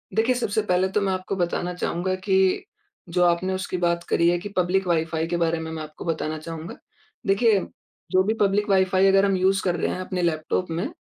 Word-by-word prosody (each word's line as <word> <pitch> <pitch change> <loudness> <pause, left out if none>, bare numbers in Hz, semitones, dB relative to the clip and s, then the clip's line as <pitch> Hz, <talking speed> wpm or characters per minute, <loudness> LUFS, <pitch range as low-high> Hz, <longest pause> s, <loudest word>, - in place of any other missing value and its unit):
देखिए, 230 +3 +2
सबसे 220 -3 0
पहले 185 -2 +1
तो 210 - +1
मैं 195 -1 0
आपको 185 +1 -3
बताना 175 0 -1
चाहूँगा, 180 +1 -2
कि 190 -1 +1 0.5
जो 180 +1 +2
आपने 175 +2 +2
उसकी 185 -1 -3
बात 170 -1 0
करी 170 - +3
है 175 - +2
कि 205 +4 -7
पब्लिक 185 +1 +1
वाई-फ़ाई 160 -1 0
के 175 0 -1
बारे 165 -1 0
में 160 0 -5
मैं 160 -1 -5
आपको 155 +2 -10
बताना 155 -1 -2
चाहूँगा। 165 +1 -7 0.5
देखिए 200 +1 +4 0.5
जो 185 0 +4
भी 215 +3 +1
पब्लिक 205 +1 +2
वाइ-फ़ाई 190 0 +3
अगर 195 +1 +5
हम 195 -1 +2
यूज़ 190 +1 +2
कर 180 -2 +1
रहे 175 - -1
हैं - - -4
अपने 185 -1 -3
लैपटॉप 170 +2 -1
में 170 +3 -2
185 Hz, 210 wpm, -24 LUFS, 170-195 Hz, 0.5 s, अगर